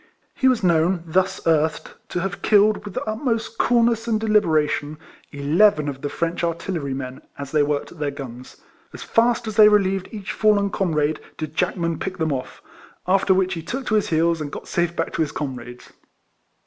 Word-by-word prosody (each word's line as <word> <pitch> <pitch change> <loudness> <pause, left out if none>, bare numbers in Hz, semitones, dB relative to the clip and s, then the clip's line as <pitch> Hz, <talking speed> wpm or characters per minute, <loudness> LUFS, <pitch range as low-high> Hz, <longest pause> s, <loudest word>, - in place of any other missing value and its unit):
He 265 - +1
was 255 -5 +2
known, 170 0 +2
thus 185 +3 0
earthed, 160 -1 +1 0.2
to 175 - -2
have 195 +1 -4
killed, 210 0 +3
with 200 - -8
the - - -2
utmost 225 0 -2
coolness 235 -1 +2
and 220 -2 +1
deliberation, 155 -8 +1 0.3
eleven 150 +3 +3
of 135 -1 -5
the 145 - -3
French 170 +3 -2
artillerymen, 140 -7 -3 0.2
as 140 -1 -7
they 155 - +3
worked 145 0 -1
at 175 - -14
their 150 -1 -1
guns. 130 -3 -9 0.4
As - - -8
fast 235 +1 +2
as 215 -1 -5
they 210 -1 +9
relieved 195 -2 +2
each 210 -1 -6
fallen 205 -2 +2
comrade 155 -6 0 0.2
did 155 -1 -6
Jack 180 +2 0
man 170 -2 -2
pick 190 0 -4
them 160 -4 0
off; 130 -1 -6 0.4
after 190 +1 +2
which 190 0 +2
he 165 - -4
took 255 +11 -5
to - - -2
his 210 -1 +2
heels, 165 0 +1
and 145 -1 -5
got - - -8
safe 175 -1 -1
back 165 - -2
to - - -1
his 150 -2 0
com 140 -4 -4
rades. 120 +1 -11
175 Hz, 195 wpm, -22 LUFS, 150-210 Hz, 0.4 s, they